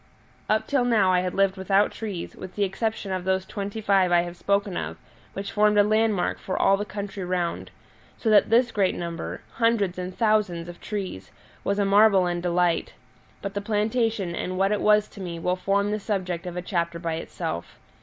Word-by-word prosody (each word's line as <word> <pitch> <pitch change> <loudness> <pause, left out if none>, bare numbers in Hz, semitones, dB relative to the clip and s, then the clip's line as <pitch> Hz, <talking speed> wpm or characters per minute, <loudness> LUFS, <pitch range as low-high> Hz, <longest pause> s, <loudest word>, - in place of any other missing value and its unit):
Up 220 0 +2
till 275 -1 +1
now 215 -6 +3
I 180 - +4
had 180 0 -2
lived 195 0 +2
without 195 +2 +2
trees, 205 -6 -6
with 185 0 -9
the 205 - +1
exception 200 +1 -2
of 185 -1 -2
those 190 0 0
twenty 200 +2 -5
five 195 -3 +3
I 175 0 +5
have 175 0 -6
spoken 200 0 0
of, - - -4 0.4
which 195 +1 -5
formed 210 0 +3
a 205 - +7
landmark 215 -2 +1
for 185 - -3
all 195 - +5
the 205 +1 -3
country 200 -1 -5
round; 180 -1 -2 0.5
so - - -5
that 210 - +5
this 240 +2 +4
great 195 -4 +1
number 170 -1 -5 0.2
hundreds 225 -6 +1
and 180 +1 -5
thousands 210 -6 +1
of 175 0 -10
trees 190 - -5 0.3
was 200 - 0
a 205 - +2
marvel 200 -1 +5
and 175 -1 -1
delight. 175 -1 +1 0.5
But 200 - -4
the 205 - -2
plantation 215 -2 0
and 185 +1 -3
what 195 +1 +2
it 210 - 0
was 210 0 +4
to 200 - -11
me 175 -2 -5
will 180 +2 0
form 200 +2 0
the 215 - -1
subject 180 -4 -3
of 175 0 -5
a 180 - -3
chapter 170 -2 -1
by 165 -1 -3
itself. 165 - -5
195 Hz, 205 wpm, -25 LUFS, 180-210 Hz, 0.5 s, a